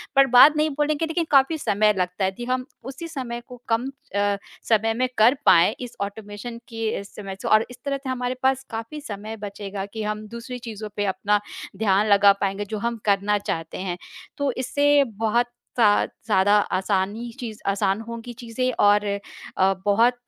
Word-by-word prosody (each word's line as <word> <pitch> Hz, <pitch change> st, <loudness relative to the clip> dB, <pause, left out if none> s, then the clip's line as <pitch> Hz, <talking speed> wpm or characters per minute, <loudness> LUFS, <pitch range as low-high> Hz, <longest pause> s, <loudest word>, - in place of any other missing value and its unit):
बर्बाद 270 Hz, +2 st, +7 dB
नहीं 305 Hz, +1 st, +2 dB
बोलेंगे 300 Hz, +2 st, +1 dB
लेकिन 325 Hz, +1 st, -1 dB
काफ़ी 275 Hz, +3 st, +4 dB
समय 210 Hz, -6 st, +2 dB
लगता 180 Hz, +1 st, -1 dB
है -, -, +2 dB
यदि 240 Hz, +5 st, -7 dB
हम 255 Hz, 0 st, 0 dB, 0.2 s
उसी 270 Hz, +5 st, -7 dB
समय 255 Hz, -7 st, -5 dB
को 250 Hz, -1 st, -12 dB
कम 230 Hz, +3 st, +1 dB, 0.3 s
अ, 205 Hz, 0 st, +2 dB, 0.3 s
समय 225 Hz, 0 st, +2 dB
में 255 Hz, +3 st, 0 dB
कर 220 Hz, +4 st, +6 dB
पाएँ 175 Hz, +3 st, +6 dB
इस 245 Hz, -2 st, -7 dB
ऑटोमेशन 205 Hz, +3 st, -6 dB
की 225 Hz, -1 st, -3 dB
अ, -, -, -3 dB
समय 195 Hz, -2 st, -7 dB
से -, -, -4 dB
और 215 Hz, +1 st, +5 dB
इस 250 Hz, -, -11 dB
तरह 280 Hz, -1 st, 0 dB
से 275 Hz, -1 st, -7 dB
हमारे 250 Hz, 0 st, -2 dB
पास 265 Hz, 0 st, +2 dB
काफ़ी 230 Hz, +6 st, -6 dB
समय 215 Hz, -4 st, -6 dB
बचेगा 200 Hz, -1 st, -6 dB
कि 220 Hz, -1 st, -4 dB
हम 210 Hz, 0 st, -3 dB
दूसरी 235 Hz, +3 st, -7 dB
चीज़ों 215 Hz, -1 st, -6 dB
पे 205 Hz, -, 0 dB
अपना 205 Hz, +2 st, +1 dB, 0.4 s
ध्यान 205 Hz, -1 st, +2 dB
लगा 200 Hz, -1 st, +7 dB
पाएँगे 195 Hz, +1 st, -1 dB
जो 215 Hz, +2 st, -4 dB
हम 235 Hz, +2 st, -2 dB
करना 205 Hz, 0 st, +2 dB
चाहते 165 Hz, -5 st, -4 dB
हैं। 185 Hz, -2 st, -3 dB, 0.4 s
तो 285 Hz, -2 st, 0 dB
इससे 285 Hz, +2 st, +3 dB
बहुत 225 Hz, +2 st, +2 dB, 0.3 s
ज़्या 210 Hz, -3 st, +5 dB
ज़्यादा 205 Hz, -2 st, +1 dB, 0.2 s
आसानी 200 Hz, +5 st, -1 dB
चीज़ 225 Hz, -4 st, -6 dB
आसान 195 Hz, +1 st, +1 dB
होंगी 235 Hz, +1 st, -7 dB
चीज़ें 250 Hz, +2 st, -1 dB
और 205 Hz, 0 st, +5 dB, 0.5 s
अ, 190 Hz, +1 st, +4 dB
बहुत 225 Hz, +4 st, +4 dB
220 Hz, 180 wpm, -24 LUFS, 205-250 Hz, 0.5 s, बर्बाद